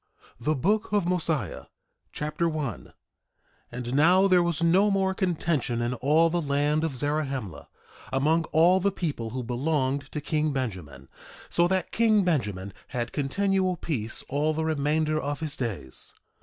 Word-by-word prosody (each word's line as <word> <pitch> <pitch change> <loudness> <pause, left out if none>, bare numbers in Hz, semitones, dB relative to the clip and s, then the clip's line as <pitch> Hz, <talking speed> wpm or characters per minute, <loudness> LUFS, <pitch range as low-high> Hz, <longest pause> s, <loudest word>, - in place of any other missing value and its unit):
THE 150 +6 0
BOOK 205 - 0
OF 205 -4 +2
MOSIAH 165 -6 +1
Mosiah 65 - -9 0.5
Chapter 155 +3 -1
1 150 - -4
1:1 - - -19 0.8
And 120 0 -5
now 175 +7 +5
there 180 -2 +5
was 170 -1 0
no 185 +5 +4
more 190 -1 +1
contention 165 - -1
in 120 +1 -1
all 155 +6 +3
the 175 0 0
land 145 +1 +1
of 160 -5 -2
Zarahemla, 135 - -2 0.4
among 155 +5 +2
all 170 +5 +4
the 200 +2 +1
people 150 -12 -3
who 125 +2 -4
belonged 135 +2 -1
to 150 - -3
king 155 +1 0
Benjamin, 90 - -5 0.4
so 170 0 +3
that 185 -1 -1
king 215 -3 +3
Benjamin 105 - -1
had 120 -3 -4
continual 185 +5 +1
peace 115 -10 -3
all 150 +3 0
the 160 0 -1
remainder 155 0 +1
of 145 0 -3
his 155 -3 -3
days. 95 - -5
150 Hz, 155 wpm, -27 LUFS, 130-170 Hz, 0.8 s, now